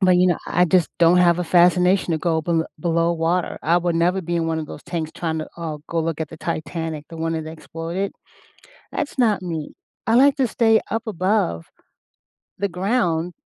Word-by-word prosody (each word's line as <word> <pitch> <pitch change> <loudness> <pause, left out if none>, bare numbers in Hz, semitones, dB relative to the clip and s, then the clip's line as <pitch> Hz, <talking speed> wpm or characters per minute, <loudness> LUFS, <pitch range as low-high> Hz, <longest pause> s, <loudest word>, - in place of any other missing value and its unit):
But, 185 -2 +5
you 180 - +4
know, 175 -3 +2
I 180 +1 +3
just 180 -1 +3
don't 170 +1 +5
have 175 -1 +4
a 180 - -1
fascination 180 +2 +4
to 160 - 0
go 160 0 0
bel 165 0 +1 0.2
below 170 0 +1
water. 170 +2 0
I 165 +3 +3
would 175 -1 -1
never 175 +3 +2
be 175 -1 -3
in 165 -1 0
one 160 0 -1
of 155 - -4
those 150 - -9
tanks 160 -3 -4
trying 160 -2 -2
to, 155 - -5
uh, 160 -3 -5
go 170 - -2
look 165 -1 -2
at 160 - -2
the 165 - -10
Titanic- 160 -1 -4
the 165 - -9
one 165 0 -2
that 160 -1 -4
exploded. 165 +4 -5 0.8
That's 290 - -4
not 215 -6 +3
me. 165 -4 -4 0.3
I 225 - +2
like 275 +4 +5
to 265 - +2
stay 225 0 +3
up 225 +2 -2
above 185 - 0 0.9
the 200 - 0
ground. 180 -3 0
170 Hz, 205 wpm, -22 LUFS, 160-185 Hz, 0.9 s, But